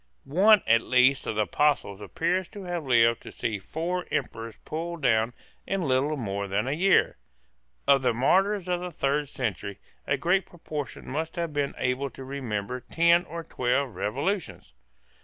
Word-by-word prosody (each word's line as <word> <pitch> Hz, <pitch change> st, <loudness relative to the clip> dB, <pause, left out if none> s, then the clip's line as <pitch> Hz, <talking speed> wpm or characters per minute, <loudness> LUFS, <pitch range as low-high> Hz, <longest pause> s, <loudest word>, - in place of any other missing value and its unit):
One 195 Hz, +7 st, +5 dB
at 115 Hz, 0 st, +5 dB
least 130 Hz, +2 st, +3 dB
of 110 Hz, -, -2 dB
the 110 Hz, -, +2 dB
Apostles 105 Hz, -, +1 dB
appears 170 Hz, -, -1 dB
to 205 Hz, -2 st, -9 dB
have 175 Hz, -5 st, -4 dB
lived 115 Hz, -2 st, +4 dB
to -, -, -10 dB
see 105 Hz, -3 st, -3 dB
four 170 Hz, -, -3 dB
Emperors 115 Hz, -1 st, -3 dB
pulled 165 Hz, 0 st, -5 dB
down 115 Hz, -1 st, +2 dB, 0.3 s
in 195 Hz, -1 st, -1 dB
little 140 Hz, +2 st, +1 dB
more 100 Hz, -4 st, -3 dB
than 105 Hz, +5 st, -1 dB
a -, -, 0 dB
year. 185 Hz, +6 st, +3 dB, 0.7 s
Of 140 Hz, -1 st, +6 dB
the 130 Hz, -, +2 dB
martyrs 190 Hz, -, +2 dB
of 180 Hz, -1 st, 0 dB
the 180 Hz, 0 st, -5 dB
third 145 Hz, -2 st, -1 dB
century 100 Hz, -7 st, -3 dB, 0.3 s
a 140 Hz, -, +2 dB
great 180 Hz, +7 st, +1 dB
proportion 155 Hz, -4 st, -7 dB
must 160 Hz, +5 st, -3 dB
have 170 Hz, -3 st, -3 dB
been 145 Hz, -1 st, -1 dB
able 125 Hz, +2 st, -1 dB
to 135 Hz, -, -10 dB
remember 125 Hz, -4 st, -4 dB
ten 170 Hz, +6 st, +3 dB
or 165 Hz, +1 st, -6 dB
twelve 125 Hz, -2 st, 0 dB
revolutions. 130 Hz, -, -3 dB
140 Hz, 165 wpm, -27 LUFS, 115-170 Hz, 0.7 s, Of